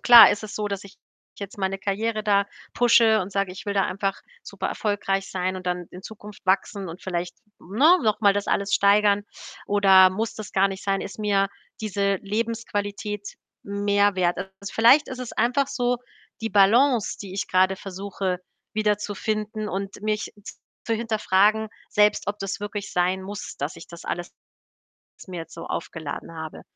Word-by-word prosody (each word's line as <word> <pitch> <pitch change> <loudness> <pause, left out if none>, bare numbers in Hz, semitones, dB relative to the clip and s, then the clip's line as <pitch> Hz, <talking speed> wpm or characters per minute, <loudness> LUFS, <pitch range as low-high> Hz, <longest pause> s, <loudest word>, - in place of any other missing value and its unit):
klar 235 -4 +10
ist 205 +1 -2
es 210 - -8
so, 210 -1 -2
dass 200 0 -4
ich 200 - -14 0.4
jetzt 200 0 -8
meine 190 0 -1
Karriere 215 +3 -1
da 200 -1 +3 0.3
pushe 230 -2 +5
und 190 +2 -5
sage, 195 -1 0
ich 190 - -10
will 200 - -1
da 195 - +3
einfach 195 +1 -2 0.2
super - - -4
erfolgreich 200 -2 -1
sein 185 0 -2
und 185 -1 -9
dann 180 -1 -2
in 180 - -10
Zukunft 210 -2 -11
wachsen 195 0 0
und 165 +3 -9
vielleicht, 175 -1 -3 0.2
ne, 290 - +4
noch 215 0 +1
mal 200 -2 +5
das 205 0 -2
alles 200 0 0
steigern. 205 0 +4 0.4
Oder 190 -2 +6
muss 220 +4 -3
das 215 - -8
gar 195 +1 +3
nicht 195 0 -7
sein, 195 -1 0
ist 200 - -7
mir 200 -2 +2 0.3
diese 200 -2 0
Lebensqualität 210 -1 -3 0.4
mehr 200 0 +2
wert? 175 -1 +1
Also, 190 - -5 0.2
vielleicht 250 +7 +5
ist 255 - -6
es 250 - -6
einfach 255 +3 +1
so 245 -2 0 0.4
die 225 - -3
Balance, 225 +4 +4
die 190 -2 -7
ich 195 - -3
grade 185 +1 +3
versuche, 190 -1 -4 0.4
wiederzufinden 215 0 -1
und 195 +1 -5
mich 215 0 -2 0.5
zu 230 - 0
hinterfragen 215 -1 +2 0.2
selbst, 210 -1 +3
ob 205 +1 -3
das 195 +2 -4
wirklich 205 -1 -5
sein 180 +1 +1
muss, 205 +2 -7
dass - - -3
ich - - -11
das - - -11
alles - - -4 1.0
mir 180 -2 -6
jetzt 165 - -10
so 165 - -8
aufgeladen 165 -1 -5
habe. 160 -1 -7
200 Hz, 175 wpm, -24 LUFS, 190-215 Hz, 1.0 s, klar